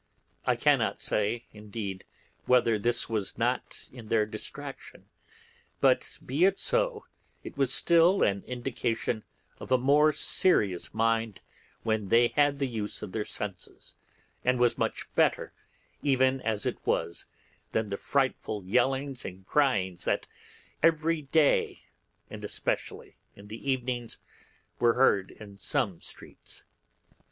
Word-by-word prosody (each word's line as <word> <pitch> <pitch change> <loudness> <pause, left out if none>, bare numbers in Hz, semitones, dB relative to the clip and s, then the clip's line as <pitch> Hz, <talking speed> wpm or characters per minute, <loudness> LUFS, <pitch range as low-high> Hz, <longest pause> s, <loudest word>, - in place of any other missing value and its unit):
I - - +4
cannot - - +2
say, 105 +3 -1
indeed, 105 -2 -6 0.4
whether 115 -3 +4
this 120 +3 +1
was 105 -4 -2
not - - -2
in 120 -3 -11
their 110 -1 +2
distraction, 105 - -8 0.7
but, - - +2
be 140 +7 0
it 195 +1 +4
so, - - 0 0.4
it - - -9
was 135 -2 +1
still 170 +6 +5
an 100 -1 +1
indication 120 -3 -2 0.4
of - - -9
a 130 - +6
more 145 +4 +4
serious 105 - +1
mind, 115 -2 0 0.4
when 110 -3 0
they 120 +4 +4
had 145 -1 +2
the 140 - 0
use 110 -4 -4
of 105 - -6
their 105 +2 -2
senses, 100 -3 -6 0.5
and 125 0 +2
was 120 -1 +3
much - - -2
better, - - +1 0.5
even 130 -1 +2
as 110 -2 -2
it - - -2
was, 85 - -1 0.4
than 110 -2 -1
the - - 0
frightful 130 -7 -1
yellings 130 +5 0
and 95 0 -8
cryings 100 -12 +1
that - - 0 0.6
every 165 0 +2
day, 145 +1 +2 0.4
and - - -9
especially - - -3 0.2
in 100 +1 -14
the 115 +6 -6
evenings, 125 -2 -2 0.6
were 120 -1 +4
heard 100 -7 +3
in 100 -2 -13
some 110 - -1
streets. - - -10
120 Hz, 130 wpm, -28 LUFS, 105-140 Hz, 0.7 s, a